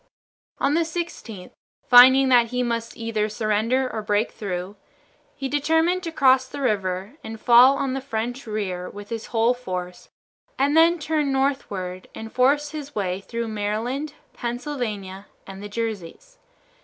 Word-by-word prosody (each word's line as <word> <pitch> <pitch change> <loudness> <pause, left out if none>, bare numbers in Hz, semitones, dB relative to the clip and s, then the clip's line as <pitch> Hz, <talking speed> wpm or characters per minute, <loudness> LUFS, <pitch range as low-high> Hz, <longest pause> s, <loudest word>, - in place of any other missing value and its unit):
On 285 - +1
the 335 - +3
16th, 320 - -5 0.4
finding 260 +2 +8
that 240 -2 +5
he 250 +1 -1
must 230 -1 -3
either 220 -2 -1
surrender 220 +4 0
or 225 -3 -4
break 210 +1 0
through, 185 -1 -5 0.6
he 270 -1 -4
determined 320 +6 +1
to 335 -2 -5
cross 260 -4 +4
the 285 - -8
river 200 -1 -2
and 225 0 -7
fall 250 +4 +6
on 270 -2 -1
the 270 - -3
French 245 0 -4
rear 185 -4 -3
with 205 0 -10
his 230 -1 -5
whole 230 +1 +2
force 185 -7 -6 0.5
and 280 +3 +2
then 335 +2 +5
turn 300 -2 -1
northward 205 -10 -2
and 220 0 -8
force 290 +3 +2
his 295 -2 -8
way 190 -3 -1
through 230 +4 -4
Maryland, 225 +8 -3 0.2
Pennsylvania, 235 -6 -5 0.2
and 195 0 -10
the 205 - -7
Jerseys. 230 - -6
235 Hz, 150 wpm, -23 LUFS, 210-275 Hz, 0.6 s, finding